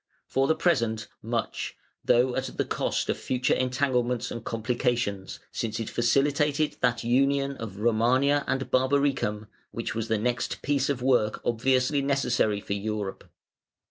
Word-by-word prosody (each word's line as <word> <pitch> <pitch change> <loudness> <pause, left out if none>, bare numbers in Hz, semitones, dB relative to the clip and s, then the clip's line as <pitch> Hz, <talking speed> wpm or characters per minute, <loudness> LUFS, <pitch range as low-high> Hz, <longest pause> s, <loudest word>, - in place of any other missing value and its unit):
For 135 +1 +1
the 160 - +3
present, 115 -10 +1
much 115 +1 -3 0.3
(though 125 +1 +3
at 130 0 -3
the - - +1
cost - - -1
of - - -1
future 125 0 0
entanglements 125 -2 0
and 115 - -5
complications), 115 -4 -1
since 110 -1 -3
it 115 - -4
facilitated 145 +4 +1
that 120 -2 +1
union 140 +3 +2
of 105 -4 -7
"Romania" 130 +6 +3
and 135 0 -2
"Barbaricum", 130 -5 +1 0.2
which 115 - -4
was 115 0 -3
the 110 - +1
next 120 +3 -2
piece 140 -1 +1
of 130 -3 -1
work 120 -5 +2
obviously 130 +4 +2
necessary 125 -6 +1
for 100 - -4
Europe. 100 -1 -4
125 Hz, 140 wpm, -27 LUFS, 115-135 Hz, 0.3 s, the